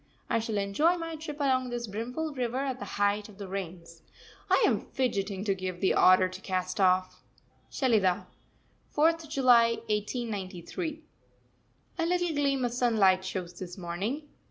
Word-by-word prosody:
I 230 - +3
shall 220 -1 -2
enjoy 205 - +2
my 330 -1 -5
trip 305 -1 -7
along 260 -3 +1
this 240 -1 -3
brimful 245 +9 -4
river 250 -2 -2
at 265 -1 -2
the - - -5
height 205 +1 +1
of 200 - -15
the 200 -2 -7
rains. 170 -3 -7 0.5
I - - +4
am - - +1
fidgeting 200 -6 -1
to 200 -2 +1
give 185 -2 -5
the 190 - +2
order 185 0 +6
to 185 0 -9
cast 185 0 -2
off. 185 -1 +2 0.5
SHELIDAH, 215 -9 +2 0.7
4th 320 +1 +2
July 245 -5 +5 0.2
1893. 210 - -3 1.0
A 330 - +2
little 355 0 +1
gleam 275 -3 +1
of 240 - -2
sunlight 215 -7 +3
shows 180 -2 -5
this 180 0 -7
morning. 195 - -3
220 Hz, 155 wpm, -29 LUFS, 185-270 Hz, 1.0 s, order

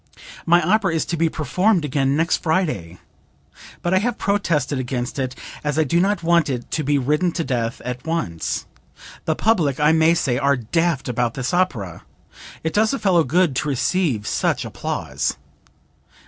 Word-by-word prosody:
"My 175 0 +5
opera 190 -1 +2
is 160 - 0
to 170 - -2
be 165 0 +1
performed 175 +5 +1
again 140 0 +1
next 165 +1 +2
Friday, 150 - -1 0.9
but 175 - 0
I 185 - +5
have 240 +3 -1
protested 155 -9 0
against 125 +1 -3
it 130 -1 -2 0.3
as 150 0 -1
I 160 - +4
do 170 +4 +1
not 195 -1 +1
want 170 -2 +3
it 125 -3 -4
to 155 - -1
be 145 +1 +2
ridden 150 +7 +1
to 165 - -1
death 120 -5 -2
at 125 0 -4
once. 160 - -2 0.6
The 160 - +1
public, 165 - +1
I 150 +1 +4
may 160 +1 +4
say, 125 -6 0
are 140 0 +2
daft 155 +5 0
about 120 -1 -1
this 130 +2 -3
opera. 125 - -1 0.6
It 160 - -2
does 220 +5 +2
a - - -2
fellow 180 -8 +3
good 170 -3 +2
to 150 - -1
receive 140 - 0
such - - 0
applause." - - -3
155 Hz, 175 wpm, -21 LUFS, 130-175 Hz, 0.9 s, My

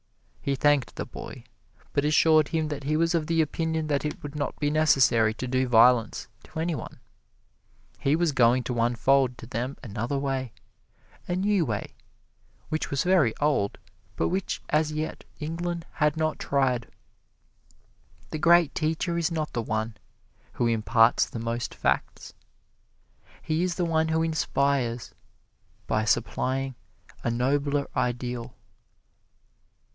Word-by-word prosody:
He 140 - 0
thanked 145 -1 +2
the - - -4
boy, - - -9 0.5
but 140 - +1
assured 155 0 +4
him 160 -2 -1
that 145 -2 -5
he 155 +2 +1
was 165 +1 +2
of 160 -3 0
the 165 -1 +1
opinion 160 +1 -2
that 145 -2 0
it 150 -1 -4
would 145 -1 -6
not 145 -1 -3
be 145 0 +1
necessary 130 -8 +4
to 130 - -4
do 130 +1 +1
violence 120 -1 +4 0.2
to - - -7
any 170 +1 0
one; - - -7 1.0
he 140 +2 +2
was 170 -1 +2
going 125 -1 +4
to 120 0 -3
unfold 125 +2 +2
to 115 - -10
them 125 +4 -4
another 115 +4 -3
way 135 -3 -2 0.7
a 175 - -1
new 195 0 +2
way, 110 -8 -3 0.8
which 155 0 -2
was 140 -2 0
very 175 -11 +3
old, 140 -9 +1 0.4
but - - 0
which 185 +1 -2
as 155 0 +2
yet 155 +1 -4 0.2
England 170 +2 -3
had 150 0 +1
not 155 -1 -1
tried. 130 -5 0 1.4
The 155 - -3
great 170 -1 +5
teacher 165 +2 -1
is 170 +1 0
not 155 -2 -3
the 120 - -1
one 110 0 -2 0.6
who 120 - 0
imparts 115 0 +3
the - - -6
most 115 +1 -3
facts - - -1 1.1
he 160 +1 0
is 180 -1 0
the 180 - 0
one 160 -1 +1
who 160 0 +1
inspires 140 -6 0 0.7
by 110 0 0
supplying 135 +3 0 0.5
a - - 0
nobler 140 +4 0
ideal. 125 -1 -2
140 Hz, 145 wpm, -26 LUFS, 125-160 Hz, 1.4 s, great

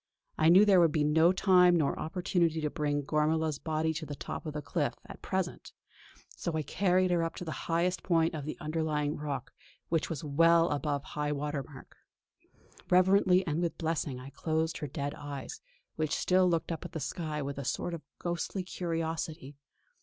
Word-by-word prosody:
I 155 - +4
knew 190 +5 +8
there 195 -3 +6
would 165 -3 +5
be 150 -1 +1
no 160 +3 +5
time 180 -2 +5
nor 150 -4 0
opportunity 170 -1 0
to 150 -1 -1
bring 145 -1 -1
Gormala's 155 +1 0
body 160 0 -1
to 155 +1 -5
the 145 - -5
top 155 - -6
of 155 - -4
the 150 - -4
cliff - - -1
at - - -11
present; - - -3 0.6
so 170 - -3
I 155 - -1
carried 185 +3 +2
her 175 -1 +2
up 165 0 -2
to 180 - -6
the 160 - -6
highest 175 +2 +1
point 165 -2 +2
of 155 -3 -4
the 155 - -5
underlying 155 -1 -1
rock, 140 -3 -4 0.4
which 165 -1 0
was 165 0 -4
well 165 +3 +4
above 145 -1 -1
high 150 0 -3
water 145 0 -2
mark. 135 -1 -13 0.9
Reverently 185 0 +4
and 160 +1 -1
with 170 -1 -2
blessing 155 -5 -2
I 130 +2 -10
closed 160 +1 -1
her 150 - -4
dead 140 +1 -4
eyes, 145 -2 -7 0.4
which 155 -1 0
still 185 0 +3
looked 165 0 0
up 165 - -4
at - - -8
the 160 - -3
sky 155 -1 -3
with 140 0 -4
a - - -4
sort 170 +7 -2
of 165 - -5 0.2
ghostly 175 +2 -3
curiosity. 165 -4 -4
160 Hz, 190 wpm, -30 LUFS, 150-170 Hz, 0.9 s, knew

